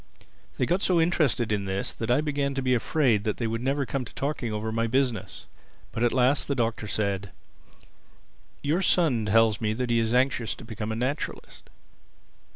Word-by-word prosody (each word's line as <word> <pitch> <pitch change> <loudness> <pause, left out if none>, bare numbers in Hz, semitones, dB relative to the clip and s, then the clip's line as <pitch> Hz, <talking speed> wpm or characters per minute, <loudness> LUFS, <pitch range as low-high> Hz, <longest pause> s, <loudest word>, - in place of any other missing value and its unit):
They - - +2
got 180 +3 0
so 180 -4 +3
interested 155 -9 +2
in 100 -2 0
this 95 0 -2
that 115 - -5
I 125 +4 +4
began 140 -2 -1
to 135 - -2
be 130 -1 +2
afraid 120 -3 +2
that 105 - -1
they 120 - -2
would 115 0 -2
never 135 +2 0
come 135 0 -2
to 120 - -12
talking 135 -5 -2
over 105 +1 -3
my 115 +1 0
business. 115 -6 -1 0.5
But 115 - -4
at 120 - +3
last 130 +2 +2
the 140 - 0
Doctor 115 -3 -1
said, 100 -1 -1 1.3
"Your 155 +6 +1
son 150 - +2
tells 110 +1 +3
me 110 -1 0
that 125 +1 -2
he 115 - +3
is 115 -1 0
anxious 125 -5 +1
to 115 - -12
become 110 -1 -5
a - - -2
naturalist." 130 +6 -4
120 Hz, 190 wpm, -26 LUFS, 110-140 Hz, 1.3 s, I